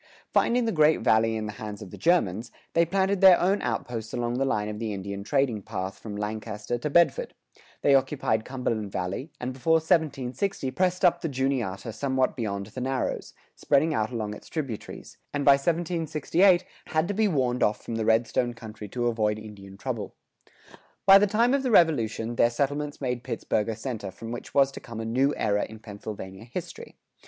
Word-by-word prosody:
Finding 240 0 +3
the 225 - +1
Great 155 -3 +4
Valley 110 0 +3
in 110 -1 -3
the 105 - -4
hands 105 -2 -6
of 90 - -10
the - - -8
Germans, 115 - +1 0.2
they 170 0 +3
planted 195 +2 +1
their 190 -2 +8
own 195 +3 +2
outposts 115 -2 -3
along 120 +1 -1
the 135 - +2
line 105 -5 0
of 105 0 -5
the 110 -2 -3
Indian 100 0 -5
trading 120 -2 +1
path 95 0 -5
from 105 -2 -7
Lancaster 105 +2 -4
to 150 - -2
Bedford; 175 - +2 0.5
they 140 - +5
occupied 130 -5 +2
Cumberland 115 -6 -3
Valley, 95 - -3
and 125 +1 -3
before 135 +6 +1
1760 160 -1 0
pressed 185 +2 +1
up 175 - +4
the 165 - -2
Juniata 125 -7 -2
somewhat 130 0 0
beyond 100 -4 -3
the 110 +5 -8
narrows, 130 0 -2 0.2
spreading 155 +3 +2
out 110 -4 0
along 110 -4 -3
its - - -12
tributaries, 135 -9 -6 0.2
and 145 -1 -1
by 140 - +8
1768 170 +4 +2 0.2
had 155 +1 +1
to 205 - -1
be 215 +1 +2
warned 130 -8 0
off 105 - +1
from - - -5
the 115 0 -1
Redstone 115 +2 +1
country 110 -2 -9
to 120 +4 -3
avoid 110 -3 +1
Indian 100 -3 -11
trouble. 115 -2 -4 0.9
By 195 0 +9
the 205 - +3
time 230 +5 +2
of 280 - +2
the 260 - -1
Revolution, 120 - +2
their 120 - +5
settlements 145 +4 -2
made 125 -2 -2
Pittsburgh 105 -2 -1
a 110 - -2
center 110 -3 -5
from 115 +5 -8
which 120 - -7
was 135 -1 +5
to - - -8
come 115 -1 -8
a 110 - -4
new 130 +5 +1
era 105 -1 +1
in 110 - -8
Pennsylvania 105 -2 -8
history. 120 - -8
125 Hz, 190 wpm, -27 LUFS, 110-155 Hz, 0.9 s, By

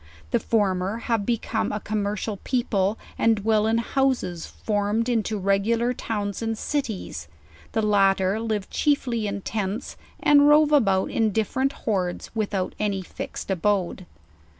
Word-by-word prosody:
The - - +3
former 195 -2 0
have 230 -3 -1
become 230 -1 -1
a 210 - -2
commercial 210 0 -2
people, 210 -4 0 0.2
and 225 0 +4
dwell 215 +1 +2
in 225 +1 +2
houses 235 -8 0
farmed 210 +2 -1
into 220 -3 0
regular 210 +5 +1
towns 205 -4 -3
and 225 -1 -2
cities; 245 -7 -3 0.5
the 220 - +1
lat 195 -2 +4
ter 190 +3 0
live 215 -3 -2
chiefly 245 -7 +1
in 200 0 -3
tents, 210 +3 -3 0.2
and 290 0 +6
rove 300 0 +6
about 195 -10 +3
in 220 -2 +2
different 260 +6 0
hordes, 185 -5 -1
without 205 -4 -1
any 200 -3 -1
fixed^ 190 - -6
abode. 190 -1 0
215 Hz, 140 wpm, -25 LUFS, 195-230 Hz, 0.5 s, and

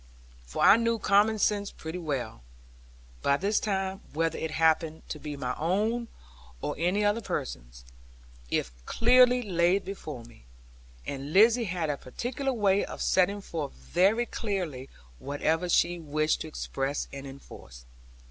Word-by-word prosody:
For - - -2
I 210 - +8
knew 230 0 +1
common 210 +1 +3
sense 205 0 +1
pretty 160 +3 -7
well, 135 - -4 0.8
by 140 - +3
this 200 +6 +1
time, 195 -1 -2
whether 165 +1 0
it 160 - -2
happened 160 0 +1
to 150 - -5
be 145 -1 -6
my 125 -2 -2
own, 215 +9 0 0.5
or - - -3
any 185 +5 +1
other 205 +3 +2
person's, - - -5 0.6
if 60 - -1 0.2
clearly 250 +1 +5
laid 180 0 +2
before 155 -10 -7
me. 115 - -17 0.6
And 140 +2 -5
Lizzie 230 +4 +6
had 170 -5 -1
a 145 - -3
particular 250 - -3
way 200 -5 +2
of - - -7
setting 200 +2 +2
forth 155 -7 -5
very 200 +8 +2
clearly 180 - -4 0.3
whatever 160 +5 -1
she 175 0 +3
wished 155 0 0
to - - -4
express 140 -2 -3
and 140 0 -7
enforce. 65 - -12
175 Hz, 145 wpm, -28 LUFS, 145-205 Hz, 0.8 s, I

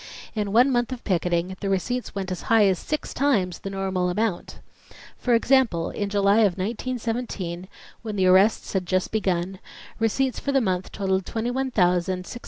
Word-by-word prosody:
In 210 -2 -2
one 245 +6 +5
month 240 0 0
of 250 -2 -6
picketing 180 -1 0
the 195 - -3
receipts 235 +7 -2
went 190 -2 -3
as 185 - -4
high 225 -2 +6
as 190 -2 +2
six 305 - -4
times 210 - +1
the 195 - -6
normal 190 -2 -1
amount. 205 0 -2 0.6
For 245 -2 +2
example 230 -9 +2
in 205 -1 -3
July 200 0 +3
of 200 -5 +3
1917, 225 -4 -3 0.3
when 215 -2 -5
the 190 -2 +2
arrests 190 +4 +4
had 185 -2 -1
just 185 0 0
begun, 185 -3 -1 0.4
receipts 245 +4 0
for 280 - -2
the 275 - +3
month 185 -5 -1
totalled 190 -2 -1
$21,628. 210 -5 0
200 Hz, 165 wpm, -24 LUFS, 185-235 Hz, 0.6 s, high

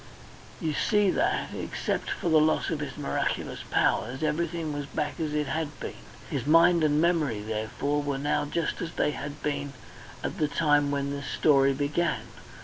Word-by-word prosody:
You 155 -2 -1
see 205 +3 +3
that, 340 +5 0
except - - -3
for - - -3
the 160 -1 +6
loss 155 +2 +2
of 160 - -1
his 145 0 -5
miraculous 145 - -2
powers, 130 +4 +1
everything 160 0 -1
was 145 -1 -4
back 150 0 -3
as 155 -2 -2
it 150 0 +1
had 155 0 -3
been, - - -5 0.3
his - - -3
mind 165 +1 +6
and 150 -1 +3
memory 160 -9 +2
therefore 110 +7 -1
were 145 -1 -2
now 145 +1 0
just 165 +2 -2
as 170 -1 -4
they - - +1
had 145 0 -7
been 145 -1 -2 0.5
at 195 - -3
the 155 - +3
time 145 -2 +2
when 140 0 -1
this 140 -1 -5
story 140 -3 +4
began. 145 -3 0
150 Hz, 175 wpm, -28 LUFS, 140-160 Hz, 0.5 s, the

